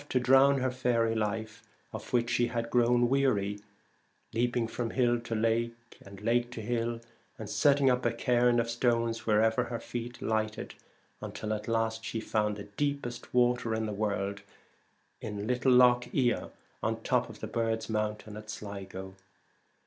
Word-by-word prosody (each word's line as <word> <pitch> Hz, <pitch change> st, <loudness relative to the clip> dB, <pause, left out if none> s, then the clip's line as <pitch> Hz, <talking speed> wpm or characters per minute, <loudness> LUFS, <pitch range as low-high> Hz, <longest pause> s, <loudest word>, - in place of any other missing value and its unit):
to 130 Hz, -, +2 dB
drown 135 Hz, +2 st, +5 dB
her 130 Hz, 0 st, +1 dB
faery 120 Hz, -3 st, +1 dB
life, 110 Hz, 0 st, -3 dB, 0.3 s
of -, -, -7 dB
which 120 Hz, -1 st, +2 dB
she 120 Hz, 0 st, +2 dB
had 115 Hz, -1 st, -3 dB
grown 120 Hz, 0 st, +4 dB
weary, 110 Hz, -7 st, +1 dB, 0.7 s
leaping 120 Hz, 0 st, +1 dB
from 115 Hz, +1 st, -3 dB
hill 120 Hz, 0 st, +2 dB
to 115 Hz, -1 st, -4 dB
lake 115 Hz, +1 st, -1 dB
and 100 Hz, 0 st, -12 dB
lake 120 Hz, +2 st, +2 dB
to 125 Hz, -, -7 dB
hill, 115 Hz, +1 st, -2 dB, 0.4 s
and 110 Hz, -, -7 dB
setting 140 Hz, -2 st, +4 dB
up 125 Hz, -1 st, +3 dB
a 120 Hz, -, +2 dB
cairn 120 Hz, +1 st, +2 dB
of 115 Hz, -, 0 dB
stones 115 Hz, -1 st, 0 dB
wherever 110 Hz, +1 st, +3 dB
her 115 Hz, -1 st, -4 dB
feet 120 Hz, +1 st, -6 dB
lighted, 110 Hz, -1 st, -2 dB, 0.5 s
until 110 Hz, 0 st, -4 dB
at 105 Hz, 0 st, -5 dB
last 115 Hz, -1 st, 0 dB
she 115 Hz, -, -3 dB
found 105 Hz, -1 st, 0 dB
the 100 Hz, -, -6 dB
deepest 120 Hz, +2 st, -3 dB
water 120 Hz, -2 st, +2 dB
in 110 Hz, 0 st, -1 dB
the 105 Hz, -, -3 dB
world 100 Hz, -1 st, -2 dB, 0.8 s
in 105 Hz, -1 st, -5 dB
little 125 Hz, +2 st, +2 dB
Lough 125 Hz, -1 st, +6 dB
la, 125 Hz, -3 st, +1 dB, 0.3 s
on -, -, 0 dB
the -, -, -15 dB
top -, -, +1 dB
of -, -, -11 dB
the -, -, -5 dB
Birds' 115 Hz, -1 st, -1 dB
Mountain 105 Hz, -1 st, -3 dB
at 110 Hz, 0 st, -10 dB
Sligo. 95 Hz, -3 st, -7 dB
115 Hz, 165 wpm, -30 LUFS, 110-120 Hz, 0.8 s, Lough